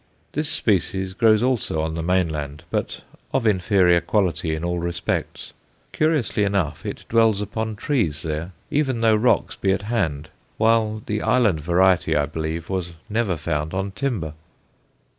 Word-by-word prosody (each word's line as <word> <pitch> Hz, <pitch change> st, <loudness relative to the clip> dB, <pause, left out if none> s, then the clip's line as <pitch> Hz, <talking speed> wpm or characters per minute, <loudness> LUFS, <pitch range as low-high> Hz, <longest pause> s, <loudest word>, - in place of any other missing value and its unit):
This 150 Hz, +1 st, -2 dB
species 95 Hz, -2 st, 0 dB
grows 110 Hz, +1 st, +4 dB
also 125 Hz, -11 st, 0 dB
on 80 Hz, 0 st, -2 dB
the 80 Hz, -, -3 dB
mainland, 80 Hz, -4 st, -1 dB
but -, -, -2 dB, 0.3 s
of 135 Hz, -3 st, 0 dB
inferior 95 Hz, -3 st, +4 dB
quality 85 Hz, -6 st, 0 dB
in 80 Hz, -, -5 dB
all 85 Hz, 0 st, -1 dB
respects; 85 Hz, 0 st, -3 dB, 0.4 s
curiously 155 Hz, -9 st, +1 dB
enough 95 Hz, -7 st, -1 dB
it -, -, -6 dB
dwells 115 Hz, -3 st, +3 dB
upon 110 Hz, +2 st, -3 dB
trees 100 Hz, -, -1 dB
there, 80 Hz, +3 st, -3 dB, 0.2 s
even 135 Hz, -5 st, 0 dB
though 110 Hz, -1 st, +5 dB
rocks 115 Hz, +4 st, +2 dB
be 95 Hz, -, 0 dB
at 100 Hz, +1 st, 0 dB
hand, 85 Hz, -10 st, -1 dB, 0.3 s
while 110 Hz, -1 st, +2 dB
the 105 Hz, 0 st, -2 dB
island 110 Hz, -10 st, +3 dB
variety, 90 Hz, +3 st, +3 dB
I 75 Hz, -, +2 dB
believe, 80 Hz, +2 st, -4 dB
was 90 Hz, -3 st, -3 dB, 0.2 s
never 105 Hz, -5 st, 0 dB
found 75 Hz, +1 st, -2 dB
on 95 Hz, +1 st, -2 dB
timber. 105 Hz, -, -2 dB
95 Hz, 150 wpm, -23 LUFS, 80-110 Hz, 0.4 s, though